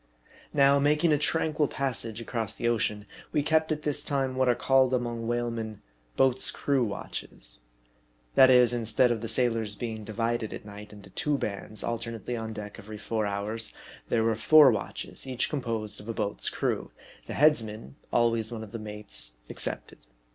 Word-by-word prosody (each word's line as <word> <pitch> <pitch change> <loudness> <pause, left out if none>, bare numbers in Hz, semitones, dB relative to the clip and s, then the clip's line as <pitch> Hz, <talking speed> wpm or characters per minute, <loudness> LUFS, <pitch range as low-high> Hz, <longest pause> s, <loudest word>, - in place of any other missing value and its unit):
Now, 140 -1 +5
making 150 +3 +3
a 145 - +2
tranquil 155 0 +1
passage 120 -5 -2
across 115 -2 -3
the 120 - -1
ocean, 105 -3 0 0.3
we 145 - +1
kept 160 +1 +2
at 150 0 -2
this 145 -1 -1
time 135 -2 -1
what 130 -1 +2
are 120 - +4
called 130 0 +3
among 120 -2 -3
whalemen 115 -3 -3 0.2
" - - -36
boats 130 -1 +3
crew 140 -3 +1
watches." - - -6 0.7
That 130 - +7
is, 125 -1 +6
instead 120 +1 +2
of 115 -2 -1
the 115 - -3
sailors 115 -4 0
being 110 -2 -5
di 105 - -7
vided 115 0 -1
at - - -8
night 105 0 -10
into 100 -2 -13
two 150 +7 0
bands, 105 -1 -4
alternately 115 0 -3
on 110 -1 -4
deck 105 -1 -7
every 105 +1 -9
four 110 0 -2
hours, 105 +3 -2 0.3
there 115 -1 +2
were 115 0 +2
four 145 +5 +7
watches, 110 +4 -4
each 130 -1 -1
composed 115 -7 -3
of 105 - -10
a 115 - -3
boat's 105 -2 0
crew, - - -2 0.4
the - - -5
" - - -5
headsman" 110 - +2 0.2
(always 115 -1 +2
one 110 -2 -5
of 105 - -10
the 115 - -5
mates) 105 - -7
ex - - -2
cepted. - - -6
115 Hz, 185 wpm, -28 LUFS, 105-130 Hz, 0.7 s, That